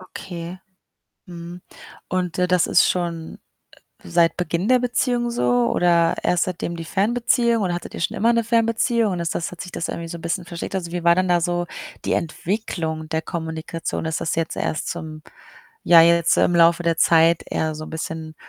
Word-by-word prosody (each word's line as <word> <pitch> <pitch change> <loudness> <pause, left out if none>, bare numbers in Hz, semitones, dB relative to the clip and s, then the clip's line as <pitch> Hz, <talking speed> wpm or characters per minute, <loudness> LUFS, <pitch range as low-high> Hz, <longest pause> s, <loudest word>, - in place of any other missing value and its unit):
Okay. 180 -1 -8 0.7
Mhm. 175 0 -9 0.5
Und, 180 -2 -2
äh, 180 - +3
das 180 -1 +3
ist - - +4
schon, 170 -2 -3 0.6
äh, - - -12
seit 170 -1 +3
Beginn 180 +3 -2
der 255 0 +5
Beziehung 245 -1 0
so 125 - +1
oder 170 -1 +3
erst 180 - +2
seitdem 175 -1 -4
die 165 - -6
Fernbeziehung 235 +4 +1
oder 180 -2 0
hattet 175 - -7
ihr - - -6
schon - - -1
immer 230 +3 +3
'ne 230 -1 +1
Fernbeziehung 230 -1 +1
und 175 - -3
ist 170 -1 -2
das 170 - -2
hat 175 - -10
sich 180 - -7
das 170 - -3
irgendwie 165 0 -5
so 170 - -6
'n - - -12
bisschen 170 +2 -3
verschlechtert? 175 +3 -4
Also, 170 0 -8
wie 175 -1 -4
war 170 0 +6
denn 185 0 +1
da 175 -1 +3
so 175 0 -1 0.4
die - - 0
Entwicklung 160 -2 -3
der 160 0 -1
Kommunikation? 160 0 -4
Ist 160 -1 -2
das 160 - -1
jetzt 165 -1 -2
erst 155 - -2
zum 155 -2 -6 0.6
ja, 170 -1 +8
jetzt 170 0 +4
im 175 - +3
Laufe 170 0 +5
der 165 -1 +1
Zeit 165 0 +4
eher 155 -1 -2
so 155 0 -7
'n - - -10
bisschen 160 0 -5
170 Hz, 200 wpm, -22 LUFS, 165-185 Hz, 0.7 s, ja